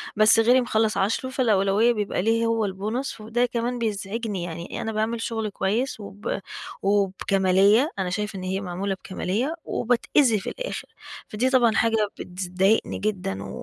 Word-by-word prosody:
بس 215 +2 +6
غيري 245 +3 +5
مخلّص 220 -2 +1
10، 225 +6 0
فالأولوية 220 -2 +3
بيبقى 210 -4 -1
ليه 225 +2 +2
هو 225 -2 +1
البونص. 215 +6 -4
وده 235 +3 +1
كمان 240 0 -2
بيزعجني، 210 -2 -3
يعني 170 +6 -6
أنا 225 - -3
باعمل 220 +1 -1
شغل 225 -2 -2
كويس، 220 +6 -1
وب 205 0 -5 0.4
وبكمالية. 195 - +3
أنا 185 -1 -1
شايفة 210 +1 -3
إن - - -7
هي 190 +1 -2
معمولة 190 +1 -3
بكمالية، 210 - -2
وباتأذي 240 -1 +2
في - - -5
الآخر. - - -5 0.4
فدي 240 +5 0
طبعًا 245 -4 +4
حاجة 225 -2 +2
بتذ 180 0 -5
ضايقني 195 +4 +2
جدًا، 180 - -2
و - - -8
215 Hz, 155 wpm, -24 LUFS, 195-230 Hz, 0.4 s, بس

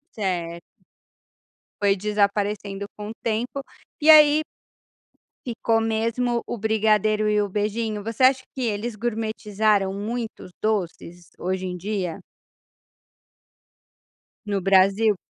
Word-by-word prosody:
Certo. 170 -4 -3 1.2
Foi 200 -1 +4
desaparecendo 205 0 -1
com 210 0 -6
o - - -5
tempo, 235 +5 -2 0.4
e 310 - +3
aí 305 0 +8 1.0
ficou 225 -1 0
mesmo 230 +2 0
o 240 - -4
brigadeiro 215 0 +2
e 210 0 +2
o 205 - -2
beijinho, 210 +1 -2
você 225 +4 -2
acha 260 0 +5
que 265 - -4
eles 225 -1 -2
gourmetizaram 215 -3 0
muitos 220 -1 -5
doces 175 -5 -3
hoje 185 +1 -2
em 180 -1 -4
dia 185 -2 -4 2.2
no 200 -2 -1
Brasil? 195 +3 +4
210 Hz, 105 wpm, -24 LUFS, 195-225 Hz, 2.2 s, aí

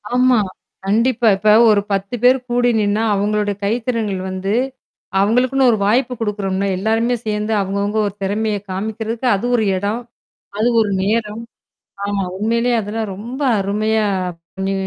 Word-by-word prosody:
ஆமா, 250 -2 +4 0.5
கண்டிப்பா. 230 +3 +2
இப்ப 210 +2 +1 0.2
ஒரு 205 -1 +4
10 195 +4 -1
பேர் 255 +1 +6
கூடி 245 0 +2
நின்னா, 210 +2 +1
அவங்களோட 205 +1 0
கைத்திறன்கள் 220 -3 -1
வந்து, 190 +2 -2 0.7
அவங்களுக்குனு 250 +5 +3
ஒரு 220 - +1
வாய்ப்பு 250 +4 +2
கொடுக்கறோம்னே. 200 -2 -1
எல்லாருமே 225 +4 +1
சேர்ந்து, 210 +1 -1
அவங்க 195 +1 -3
அவங்க 210 +2 -1
ஒரு 200 - -5
திறமையை 210 +1 -1
காமிக்கிறதுக்கு 220 +5 -3
அது 195 - -3
ஒரு 220 - +2
இடம். 205 +5 -2 0.6
அது 230 +3 +2
ஒரு 210 -2 +1
நேரம். 215 +1 -1 0.6
ஆமா, 200 -1 -1
உண்மையிலேயே 235 +4 +1
அதுலாம் 215 +1 -4
ரொம்ப 240 +8 -7 0.2
அருமையா, 215 +2 0 0.6
நீ 195 - 0
215 Hz, 135 wpm, -18 LUFS, 200-235 Hz, 0.7 s, பேர்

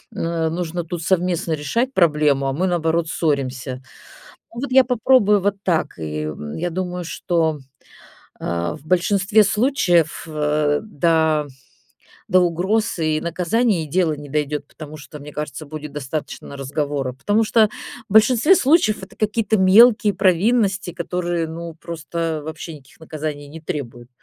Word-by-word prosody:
э, 165 -1 -1
нужно 175 +1 -3
тут 170 0 -6
совместно 180 -1 0
решать 230 - -1
проблему, 150 - +2
а 135 - -1
мы, 175 +7 0
наоборот, 170 -2 0
ссоримся. 130 -5 -2 0.7
Ну 235 - -6
вот 280 - -4
я 260 0 +7
попробую 230 -4 +3
вот 200 +1 +1
так. 170 -4 0
И 75 -1 -4
в 75 -1 -6
я 175 +2 -2
думаю, 180 0 -4
что, 165 -2 -1 0.8
а, 85 +4 -2
в 150 - -16
большинстве 195 +4 +3
случаев, 195 - +1
а, 150 -1 0
да, 160 -6 +1 0.8
до 185 +1 +5
угроз 185 +4 0
и 155 -1 0
наказаний 180 +2 0
и - - -10
дело 175 +1 +1
не 145 -1 -8
дойдёт, 150 0 -2
потому 155 -1 -10
что, 150 +1 -11
мне 145 +1 -10
кажется, 150 +1 -6
будет 150 0 -8
достаточно 145 0 -6
разговора. 140 -1 -3
Потому 205 - +1
что 215 -1 +4 0.4
в - - -6
большинстве 235 - +6
случаев 270 - +3
это - - -12
какие-то 220 0 0
мелкие 210 +2 +6
провинности, 195 0 +2
которые, 175 -1 -2
ну, 165 +1 -7
просто 165 -1 -4
вообще 160 +1 -7
никаких 135 -1 -16
наказаний 150 -2 -6
не 160 +2 -11
требуют. 120 -6 -6
165 Hz, 145 wpm, -21 LUFS, 150-190 Hz, 0.8 s, я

